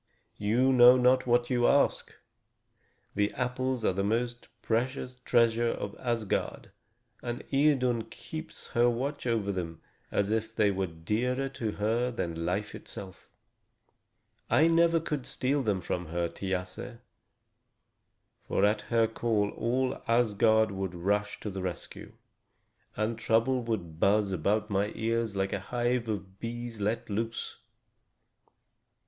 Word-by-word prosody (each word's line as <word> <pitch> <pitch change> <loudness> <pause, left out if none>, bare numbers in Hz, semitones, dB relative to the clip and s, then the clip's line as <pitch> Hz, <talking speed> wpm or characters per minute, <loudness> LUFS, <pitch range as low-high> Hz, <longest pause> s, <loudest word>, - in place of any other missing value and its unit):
"You 120 +6 +3
know 125 0 +8
not 125 +1 +3
what 120 +1 +2
you 120 -1 +3
ask! 140 - +2 1.0
The 105 0 +1
apples 125 -1 -1
are - - +3
the 100 +1 -1
most 120 +3 -1 0.2
precious 125 +2 -1
treasure 115 0 +3
of 100 -3 -4
Asgard, 115 -4 -2 0.5
and 120 0 -4
Idun 130 -5 +3
keeps 155 +7 -9
watch 120 +3 +1
over 110 -4 0
them 85 -4 -4 0.3
as 100 +1 0
if 110 0 -1
they 105 -2 +3
were 95 -1 -1
dearer 115 +11 -1
to 115 -5 -3
her 115 +4 0
than 85 -8 -3
life 100 +4 -2
itself. 95 -2 -9 1.2
I 160 - +5
never 165 0 +4
could 150 -5 -4
steal 135 +2 0
them 105 -6 0
from 90 0 -3
her, 85 +1 -1
Thiasse; 95 +6 -4 1.5
for 100 - +2
at 105 0 +2
her 115 -1 +4
call 110 -2 0
all 125 +3 -1
Asgard 110 -2 +3
would 95 -2 -4
rush 100 +4 -1
to 105 - -4
the 95 0 -5
rescue, 90 -2 -6 0.8
and 110 +2 -1
trouble 115 +3 +2
would 85 -9 -3
buzz 100 +1 +3
about 100 +5 0
my 100 +2 +1
ears 115 -1 -1
like 95 0 -1
a - - -1
hive 120 +3 -1
of 95 -2 -5
bees 120 -1 -5
let 115 +4 -1
loose." 115 +2 -3
115 Hz, 130 wpm, -29 LUFS, 100-125 Hz, 1.5 s, know